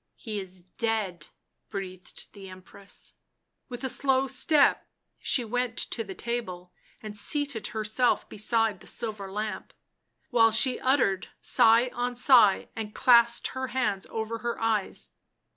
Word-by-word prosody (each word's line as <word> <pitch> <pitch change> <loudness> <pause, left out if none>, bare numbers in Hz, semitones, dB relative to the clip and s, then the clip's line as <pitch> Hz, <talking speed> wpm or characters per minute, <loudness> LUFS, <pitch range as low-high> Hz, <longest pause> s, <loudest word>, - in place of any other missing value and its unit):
" - - -53
He 215 -3 -5
is 185 -1 -7
dead," 195 -4 -2 0.4
breathed 185 -2 -7
the 195 -2 -11
Empress. 185 +2 -12 0.6
With 245 +1 -7
a - - 0
slow 265 +1 +1
step 295 +2 +3 0.3
she 245 - -1
went 245 +1 -2
to 225 - -3
the 195 -3 -9
table 185 -7 -5 0.3
and 215 -1 -7
seated 285 +1 0
herself 220 +3 0
beside 220 -1 0
the - - -15
silver 210 -4 -5
lamp, 210 +2 -5 0.6
while 225 -2 +5
she 250 +4 +2
uttered 250 -8 +1
sigh 230 +3 +4
on 245 0 -2
sigh 240 -5 +5
and 215 -2 -6
clasped 235 -2 +4
her 260 0 -4
hands 215 -7 -1
over 225 +1 -4
her 235 +1 -3
eyes. 220 -3 -1
225 Hz, 140 wpm, -27 LUFS, 200-245 Hz, 0.6 s, while